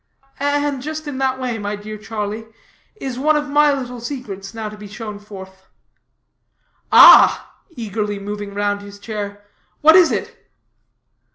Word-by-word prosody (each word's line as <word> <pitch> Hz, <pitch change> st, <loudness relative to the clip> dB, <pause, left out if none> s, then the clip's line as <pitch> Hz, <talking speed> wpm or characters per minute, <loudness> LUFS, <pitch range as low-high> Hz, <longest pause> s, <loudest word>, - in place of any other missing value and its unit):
"And 285 Hz, -1 st, 0 dB
just 310 Hz, +2 st, -6 dB
in 275 Hz, -2 st, -5 dB
that 260 Hz, -1 st, 0 dB
way, 245 Hz, -3 st, -3 dB
my 205 Hz, 0 st, -3 dB
dear 210 Hz, +1 st, -8 dB
Charlie, 215 Hz, 0 st, -5 dB, 0.5 s
is 265 Hz, -, -6 dB
one 305 Hz, +3 st, +3 dB
of 295 Hz, 0 st, -1 dB
my 295 Hz, +1 st, +4 dB
little 250 Hz, -3 st, -4 dB
secrets 220 Hz, -7 st, -7 dB
now 225 Hz, -1 st, -6 dB
to 210 Hz, -, -8 dB
be 210 Hz, 0 st, -11 dB
shown 210 Hz, 0 st, -8 dB
forth." 190 Hz, -2 st, -12 dB, 1.2 s
"Ah!" -, -, +8 dB, 0.2 s
eagerly 210 Hz, -2 st, -3 dB
moving 205 Hz, 0 st, -6 dB
round 205 Hz, 0 st, -1 dB
his 205 Hz, 0 st, -11 dB
chair, 205 Hz, -1 st, -7 dB, 0.4 s
"what 315 Hz, +2 st, +7 dB
is 360 Hz, -3 st, +6 dB
it?" -, -, -5 dB
215 Hz, 150 wpm, -19 LUFS, 205-270 Hz, 1.2 s, Ah